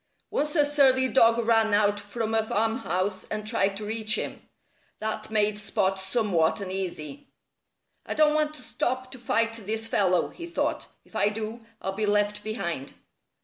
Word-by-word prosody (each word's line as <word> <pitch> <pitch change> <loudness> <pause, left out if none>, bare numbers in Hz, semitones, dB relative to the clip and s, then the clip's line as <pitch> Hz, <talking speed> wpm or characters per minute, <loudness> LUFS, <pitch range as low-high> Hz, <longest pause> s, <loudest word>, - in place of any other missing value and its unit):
Once 300 +3 0
a 295 -3 +5
surly 270 -3 +4
dog 230 -3 +5
ran 225 -2 +4
out 205 0 +3
from 220 +2 -3
a 225 - +4
farmhouse 205 -4 -1
and 215 0 -4
tried 200 -3 +1
to 210 - -5
reach 215 0 0
him. - - -4 0.6
That 215 0 -4
made 210 -1 +1
Spot 195 -2 0
somewhat 190 -4 +1
uneasy. 190 - -5 0.8
"I - - -3
don't 300 -1 +5
want 305 0 +1
to - - -9
stop 255 -3 -2
to 260 - -9
fight 230 -1 +1
this 220 0 -2
fellow," 185 -5 +2
he 340 -1 -9
thought. 345 - -1 0.2
"If - - -20
I 205 - +3
do, 220 +2 -5 0.2
I'll 190 - -2
be 210 +1 -1
left 205 0 +1
behind." 170 - -3
220 Hz, 165 wpm, -27 LUFS, 205-240 Hz, 0.8 s, a